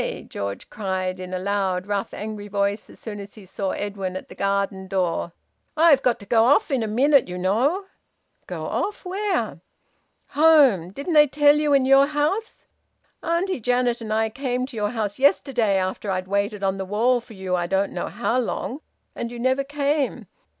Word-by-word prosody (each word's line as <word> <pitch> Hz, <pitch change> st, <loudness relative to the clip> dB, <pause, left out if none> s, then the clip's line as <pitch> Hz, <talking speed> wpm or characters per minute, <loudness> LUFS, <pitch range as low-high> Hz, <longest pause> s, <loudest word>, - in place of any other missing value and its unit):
George 100 Hz, 0 st, -5 dB
cried, 190 Hz, -3 st, -3 dB
in 185 Hz, 0 st, -7 dB
a 185 Hz, -, -2 dB
loud, 190 Hz, -1 st, -1 dB
rough, 200 Hz, -1 st, -2 dB
angry 210 Hz, -1 st, -6 dB
voice, 200 Hz, +1 st, -1 dB
as -, -, -14 dB
soon 210 Hz, -2 st, -7 dB
as 200 Hz, 0 st, -10 dB
he 210 Hz, -3 st, -13 dB
saw 190 Hz, +1 st, -3 dB
Edwin 195 Hz, -2 st, -4 dB
at -, -, -10 dB
the -, -, -10 dB
garden 195 Hz, -1 st, -1 dB
door. 180 Hz, -2 st, -1 dB, 0.5 s
"I've 310 Hz, -4 st, +6 dB
got 250 Hz, -3 st, +2 dB
to -, -, -10 dB
go 225 Hz, +2 st, +4 dB
off 285 Hz, +3 st, +3 dB
in 265 Hz, -3 st, +1 dB
a 220 Hz, -, -1 dB
minute, 270 Hz, +5 st, +3 dB
you 180 Hz, 0 st, -5 dB
know." 245 Hz, -, +1 dB, 0.6 s
"Go -, -, -5 dB
off? 410 Hz, -1 st, -3 dB
Where?" 390 Hz, +1 st, -2 dB, 0.7 s
"Home. 280 Hz, -, +5 dB
Didn't 280 Hz, -, -4 dB
they 300 Hz, -1 st, +7 dB
tell 290 Hz, +1 st, +4 dB
you 300 Hz, -1 st, +1 dB
in 275 Hz, -2 st, +4 dB
your 270 Hz, +1 st, +6 dB
house? 300 Hz, +10 st, -2 dB, 0.6 s
Auntie 345 Hz, +1 st, -1 dB
Janet 245 Hz, 0 st, +1 dB
and 220 Hz, -1 st, -5 dB
I 220 Hz, +1 st, +1 dB
came 250 Hz, +1 st, -2 dB
to 260 Hz, -2 st, -12 dB
your 210 Hz, -1 st, -1 dB
house 215 Hz, -1 st, -3 dB
yesterday, 255 Hz, -6 st, +2 dB
after 190 Hz, +2 st, -2 dB
I'd 185 Hz, -1 st, -2 dB
waited 200 Hz, +1 st, -1 dB
on 195 Hz, 0 st, 0 dB
the 190 Hz, -, -4 dB
wall 235 Hz, +5 st, +2 dB
for 230 Hz, -2 st, -14 dB
you 190 Hz, -1 st, -2 dB
I 175 Hz, -1 st, -1 dB
don't 195 Hz, +2 st, 0 dB
know -, -, -3 dB
how 240 Hz, +3 st, -1 dB
long, 250 Hz, +2 st, -3 dB, 0.4 s
and 235 Hz, -, -4 dB
you 240 Hz, -, -7 dB
never 260 Hz, +3 st, +1 dB
came. 285 Hz, 0 st, -1 dB
220 Hz, 190 wpm, -23 LUFS, 195-275 Hz, 0.7 s, they